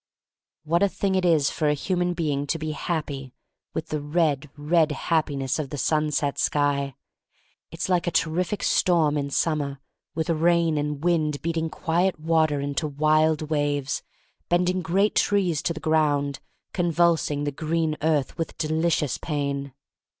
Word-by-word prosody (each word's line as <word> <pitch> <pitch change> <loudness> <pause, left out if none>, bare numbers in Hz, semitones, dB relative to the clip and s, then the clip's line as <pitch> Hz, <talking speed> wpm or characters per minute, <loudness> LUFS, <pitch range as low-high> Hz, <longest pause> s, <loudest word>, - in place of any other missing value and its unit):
What 165 +2 +1
a 200 - +4
thing 195 0 -1
it 185 -1 +1
is 155 -4 +3
for 155 -2 0
a 150 - +2
human 180 +3 -1
being 145 -4 -1
to 165 - 0
be 155 -1 -3
happy 145 -4 -4 0.2
— - - -49
^with - - -3
the 155 -1 -2
red, 150 -2 0
red 155 +1 +2
Happiness 145 -3 -1
of 145 -3 -3
the 145 - -5
sunset 150 +1 0
sky! 140 -2 +1 0.7
It's 165 - -4
like 180 -2 +1
a - - +4
terrific 170 +4 0
storm 165 -5 +3
in 140 -1 -1
summer 140 -2 -1 0.4
with 160 +2 -1
rain 165 -1 +2
and 150 0 -3
wind, 155 -4 +1
beating 165 -1 -1
quiet 170 +2 0
water 160 -2 +2
into 140 +2 -2
wild 155 +1 +2
waves, 145 -2 0 0.5
bending 180 +1 +2
great 190 +5 +1
trees 185 -7 +2
to - - -1
the 160 - -4
ground, 145 -3 +1 0.2
— - - -50
convulsing 170 -4 +1
the 145 - -1
green 160 +2 -1
earth 155 0 0
with 165 - -3
delicious 155 -3 0
pain. 140 -3 -3
155 Hz, 155 wpm, -25 LUFS, 145-170 Hz, 0.7 s, a